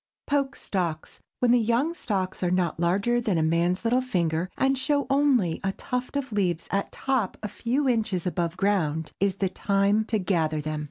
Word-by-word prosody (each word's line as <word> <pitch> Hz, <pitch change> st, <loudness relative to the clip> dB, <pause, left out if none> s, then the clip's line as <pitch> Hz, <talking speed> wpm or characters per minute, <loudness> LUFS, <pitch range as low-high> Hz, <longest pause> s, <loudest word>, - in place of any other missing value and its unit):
POKE 280 Hz, -1 st, 0 dB
STALKS. 170 Hz, -5 st, -3 dB, 0.2 s
When 245 Hz, -1 st, +4 dB
the 245 Hz, -, +5 dB
young 235 Hz, +8 st, +1 dB
stalks 190 Hz, -, -3 dB
are 180 Hz, -, +1 dB
not 175 Hz, -3 st, 0 dB
larger 200 Hz, +8 st, +2 dB
than 210 Hz, -7 st, 0 dB
a 160 Hz, -, +2 dB
man's 170 Hz, +4 st, +1 dB
little 245 Hz, +2 st, +2 dB
finger, 175 Hz, -8 st, -1 dB
and 270 Hz, 0 st, +2 dB
show 285 Hz, +2 st, 0 dB
only 265 Hz, -, +3 dB
a 195 Hz, 0 st, 0 dB
tuft 250 Hz, +4 st, -4 dB
of 275 Hz, -3 st, -3 dB
leaves 180 Hz, -5 st, 0 dB
at 200 Hz, +1 st, -1 dB
top 260 Hz, -8 st, -1 dB
a -, -, -1 dB
few 250 Hz, +7 st, -1 dB
inches 215 Hz, -8 st, 0 dB
above 175 Hz, -1 st, -1 dB
ground, 165 Hz, -6 st, 0 dB
is 195 Hz, -1 st, +1 dB
the 195 Hz, -1 st, 0 dB
time 200 Hz, +2 st, +1 dB
to 220 Hz, -, 0 dB
gather 165 Hz, -5 st, 0 dB
them. 155 Hz, 0 st, -3 dB
200 Hz, 185 wpm, -26 LUFS, 175-245 Hz, 0.2 s, the